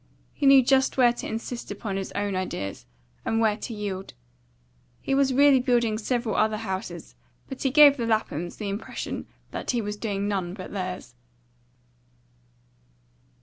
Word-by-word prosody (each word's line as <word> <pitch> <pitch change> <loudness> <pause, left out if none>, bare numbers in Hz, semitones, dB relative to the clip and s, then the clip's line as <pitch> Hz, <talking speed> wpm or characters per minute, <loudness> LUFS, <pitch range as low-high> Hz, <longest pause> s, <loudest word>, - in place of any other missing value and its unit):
He 280 - 0
knew 275 -1 +8
just 265 +2 +2
where 245 -2 +5
to - - -6
insist 230 +2 -5
upon 205 -4 -4
his 195 -1 -4
own 200 -1 -2
ideas, 100 - -4 0.4
and 225 - 0
where 220 -2 +3
to 235 - -6
yield. 200 -3 -5 0.8
He 270 - -2
was 270 -1 +3
really 275 0 +6
building 240 -3 +1
several 235 -1 -1
other 215 0 +2
houses, 190 -2 -5 0.3
but 265 - -8
he 270 - +2
gave 290 +1 +7
the 235 -2 -2
Laphams 175 -6 -1
the 210 - -4
impression 200 +2 -5 0.2
that - - -6
he 245 - +1
was 210 -1 -4
doing 205 -2 -2
none 190 -3 -2
but 185 -3 -8
theirs. 185 -8 -5
220 Hz, 155 wpm, -26 LUFS, 195-250 Hz, 0.8 s, knew